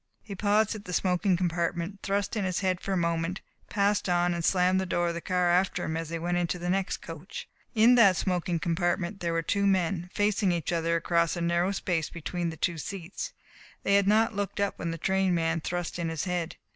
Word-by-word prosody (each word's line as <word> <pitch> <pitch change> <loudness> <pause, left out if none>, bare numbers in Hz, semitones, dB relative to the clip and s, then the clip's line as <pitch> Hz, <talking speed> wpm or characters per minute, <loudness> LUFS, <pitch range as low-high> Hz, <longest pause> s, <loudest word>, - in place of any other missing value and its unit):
He 210 - -7
paused 210 +2 +2
at 215 -2 -9
the 180 - -6
smoking 180 +1 +2
compartment, 175 +2 -1
thrust 200 +2 -1
in 215 - 0
his 185 -1 -1
head 185 -2 0
for 195 - -4
a 190 - +1
moment, 170 +1 -1 0.3
passed 200 -1 +1
on 175 0 +2
and 170 -1 -3
slammed 185 +1 +3
the 190 - -3
door 175 0 +1
of - - -2
the 170 - -5
car 180 -1 +1
after 185 +2 +1
him 160 - -2
as 165 -1 -3
he 165 - -3
went 175 +1 -1
into 175 0 -1
the 175 0 -2
next 195 0 -1
coach. 165 +4 -8 0.3
In 230 +3 +6
that 215 -6 +6
smoking 180 -1 0
compartment 175 +3 -1
there 170 -1 -1
were 165 0 0
two 200 +4 +1
men, 180 -2 +1
facing 205 -2 +1
each 170 -2 -1
other 165 0 +1
across 170 0 +1
the 175 - -4
narrow 170 +2 +1
space 175 -5 -1
between 170 +1 -3
the 160 - -7
two 170 0 -1
seats. 195 - -6 0.5
They 200 - +2
had 200 -1 +4
not 220 +2 +4
looked 200 -1 -3
up 200 0 -1
when 170 - -2
the 165 - -3
train 190 +1 +1
man 165 0 0
thrust 175 +1 -3
in 170 -1 -1
his 160 -2 -3
head. 180 -2 -2
180 Hz, 225 wpm, -28 LUFS, 170-195 Hz, 0.5 s, In